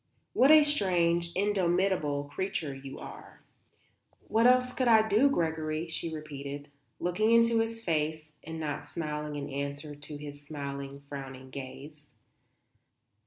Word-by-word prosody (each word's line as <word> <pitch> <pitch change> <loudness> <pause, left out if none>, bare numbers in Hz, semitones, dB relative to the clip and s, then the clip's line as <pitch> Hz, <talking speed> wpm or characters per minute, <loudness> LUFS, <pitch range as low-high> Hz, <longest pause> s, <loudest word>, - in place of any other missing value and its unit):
What 265 - +5
a 310 0 +9
strange, 175 - +2
indomitable 185 -6 +1
creature 150 0 -3
you 135 0 -8
are." - - -11 0.8
"What 225 +2 +4
else 250 0 +4
could 255 - 0
I 220 -2 +6
do, 220 +7 +5
Gregory?" 160 - -1
she 165 0 -2
repeated, 145 -2 -6 0.3
looking 195 +5 +1
into 230 0 +5
his 225 0 -2
face 155 -2 -1
and 160 +1 -6
not 150 -3 -4
smiling 150 -2 -4
in 145 -1 -4
answer 140 +2 -4
to 145 +1 -8
his 145 -1 -8
smiling, 140 -1 -6
frowning 135 -2 -8
gaze. 140 +3 -9
155 Hz, 130 wpm, -30 LUFS, 145-200 Hz, 0.8 s, a